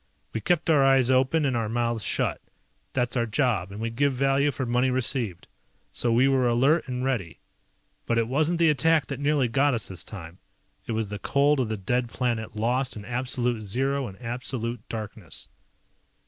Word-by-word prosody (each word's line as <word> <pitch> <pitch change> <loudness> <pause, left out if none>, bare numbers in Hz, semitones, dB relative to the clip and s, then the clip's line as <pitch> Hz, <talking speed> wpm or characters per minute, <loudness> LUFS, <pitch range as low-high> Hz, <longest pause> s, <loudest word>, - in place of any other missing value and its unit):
We 110 - -3
kept 170 - +1
our 150 -4 +5
eyes 135 -2 +4
open 130 +4 +3
and 130 -3 +1
our 115 -2 -1
mouths 115 -1 -1
shut. - - -1 0.5
That's 125 -1 0
our 120 -2 +1
job, 110 -5 0
and 100 - -8
we 115 +1 -2
give 140 +4 +1
value 135 +2 +2
for 135 -1 -3
money 125 +2 +1
received. 120 - -1 0.4
So 120 - +1
we 120 +4 +4
were 130 -2 +3
alert 135 +7 +3
and 125 0 -3
ready. 115 -11 -2 0.7
But 115 - +1
it 115 -1 +1
wasn't 155 +7 +1
the 165 -2 +4
attack 160 -1 +3
that 135 +2 -6
nearly 145 -2 +2
got 135 +3 +2
us 115 - 0
this 90 -3 -4
time. 90 -4 -9 0.5
It 115 - -2
was 110 -2 -1
the 105 0 -5
cold 140 +6 +2
of 125 -4 0
the 110 - -2
dead 120 +5 -1
planet 115 -3 -2
lost 125 +4 0
in 105 -1 -8
absolute 125 -1 0
zero 135 +6 -1
and 95 - -11
absolute 120 0 -3
darkness. 105 -6 -6
125 Hz, 190 wpm, -26 LUFS, 115-135 Hz, 0.7 s, our